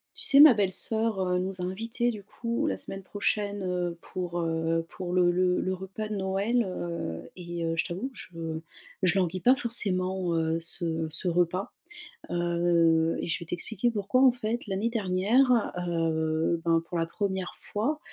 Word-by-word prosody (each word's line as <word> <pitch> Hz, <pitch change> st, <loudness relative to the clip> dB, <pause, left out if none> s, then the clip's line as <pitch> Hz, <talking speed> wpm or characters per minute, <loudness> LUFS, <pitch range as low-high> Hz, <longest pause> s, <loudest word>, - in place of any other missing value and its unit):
Tu -, -, -4 dB
sais 275 Hz, -, +6 dB
ma 300 Hz, -2 st, +11 dB
belle-soeur, 215 Hz, +1 st, 0 dB
heu, 180 Hz, -1 st, +1 dB
nous 185 Hz, 0 st, -3 dB
a -, -, -2 dB
invités 225 Hz, +6 st, -1 dB
du 210 Hz, -4 st, -7 dB
coup 235 Hz, +3 st, -2 dB
la 95 Hz, -, 0 dB
semaine 195 Hz, -, -8 dB
prochaine, 205 Hz, +1 st, -2 dB
heu, 180 Hz, -2 st, -2 dB
pour, 175 Hz, -1 st, -4 dB
heu, 165 Hz, 0 st, 0 dB
pour 180 Hz, -1 st, -6 dB
le 180 Hz, -1 st, +4 dB
le 180 Hz, 0 st, +2 dB
le 185 Hz, -, -1 dB
repas 190 Hz, +3 st, -6 dB
de 215 Hz, -, -3 dB
Noël, 200 Hz, +5 st, +1 dB
heu 125 Hz, -, -5 dB
et 175 Hz, -1 st, -5 dB
heu, 165 Hz, 0 st, 0 dB
je -, -, +1 dB
t'avoue, 185 Hz, +10 st, -4 dB
que 270 Hz, -, -19 dB
je 165 Hz, -6 st, -5 dB, 0.4 s
je 185 Hz, +1 st, +3 dB
languis 185 Hz, -1 st, 0 dB
pas 250 Hz, +6 st, +6 dB
forcément, 190 Hz, -7 st, -1 dB
heu, 165 Hz, 0 st, +1 dB
ce 165 Hz, -1 st, +1 dB
ce 160 Hz, +4 st, -1 dB
repas, 175 Hz, +2 st, +1 dB, 0.6 s
heu 170 Hz, -1 st, +2 dB
et -, -, -4 dB
je 165 Hz, -, -1 dB
vais 170 Hz, -, -8 dB
t'expliquer 210 Hz, +7 st, -2 dB
pourquoi. 210 Hz, +3 st, +1 dB
En 260 Hz, -, +8 dB
fait, 240 Hz, 0 st, -3 dB
l'année 200 Hz, +2 st, -1 dB
dernière, 225 Hz, +4 st, +2 dB, 0.2 s
heu, 160 Hz, -1 st, 0 dB
ben 165 Hz, -1 st, +3 dB
pour 175 Hz, -, -2 dB
la 165 Hz, -, +1 dB
1re 190 Hz, +1 st, -3 dB, 0.2 s
fois, 265 Hz, +9 st, 0 dB
185 Hz, 180 wpm, -28 LUFS, 170-210 Hz, 0.6 s, ma